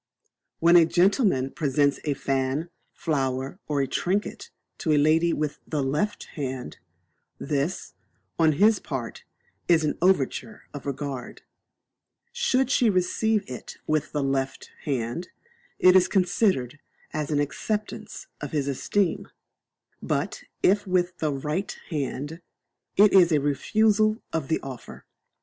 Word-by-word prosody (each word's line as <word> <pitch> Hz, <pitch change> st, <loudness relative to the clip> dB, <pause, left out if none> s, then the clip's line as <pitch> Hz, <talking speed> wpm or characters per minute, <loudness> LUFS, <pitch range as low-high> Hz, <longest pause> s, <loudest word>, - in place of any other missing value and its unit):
When 170 Hz, +1 st, +6 dB
a 165 Hz, -2 st, +6 dB
gentleman 180 Hz, -, +2 dB
presents 145 Hz, -1 st, +1 dB
a 145 Hz, -2 st, 0 dB
fan, 135 Hz, +5 st, -1 dB, 0.2 s
flower, 135 Hz, -1 st, -2 dB
or 145 Hz, -2 st, +1 dB
trinket, 185 Hz, +9 st, -2 dB, 0.3 s
to 160 Hz, -, 0 dB
a -, -, +4 dB
lady 160 Hz, +3 st, +4 dB
with 150 Hz, -2 st, -2 dB
the 150 Hz, -3 st, -1 dB
left 150 Hz, +10 st, -1 dB
hand, 130 Hz, -4 st, -5 dB, 0.6 s
this, 145 Hz, +4 st, -2 dB, 0.5 s
on 160 Hz, -1 st, +5 dB
his 210 Hz, +7 st, +4 dB
part, 130 Hz, -6 st, -6 dB, 0.4 s
is 165 Hz, -2 st, +4 dB
an 150 Hz, -, -1 dB
overture 185 Hz, -, +1 dB
of 145 Hz, -2 st, -7 dB
regard; 140 Hz, -2 st, -5 dB, 0.9 s
should 265 Hz, -, +1 dB
she 245 Hz, -4 st, +4 dB
receive 210 Hz, +3 st, +1 dB
it 125 Hz, -, -8 dB
with 155 Hz, -1 st, 0 dB
the 145 Hz, -2 st, -1 dB
left 135 Hz, 0 st, -2 dB
hand, 135 Hz, +4 st, -2 dB, 0.5 s
it 185 Hz, 0 st, +6 dB
is 185 Hz, -1 st, +6 dB
considered 180 Hz, -, +1 dB, 0.3 s
as 150 Hz, -2 st, -2 dB
an 150 Hz, -2 st, +1 dB
acceptance 210 Hz, +9 st, -3 dB, 0.2 s
of -, -, -6 dB
his 145 Hz, -2 st, 0 dB
esteem; 170 Hz, +7 st, 0 dB, 0.7 s
but -, -, -2 dB, 0.2 s
if 200 Hz, +2 st, +3 dB
with 180 Hz, -1 st, 0 dB
the 155 Hz, -2 st, 0 dB
right 150 Hz, +8 st, -3 dB
hand, 145 Hz, +2 st, -3 dB, 0.6 s
it 205 Hz, 0 st, +6 dB
is 180 Hz, -3 st, +6 dB
a 150 Hz, -, +4 dB
refusal 215 Hz, +10 st, +2 dB, 0.2 s
of 160 Hz, -4 st, -1 dB
the 160 Hz, -, +1 dB
offer. 130 Hz, -3 st, -9 dB
155 Hz, 130 wpm, -25 LUFS, 140-185 Hz, 0.9 s, When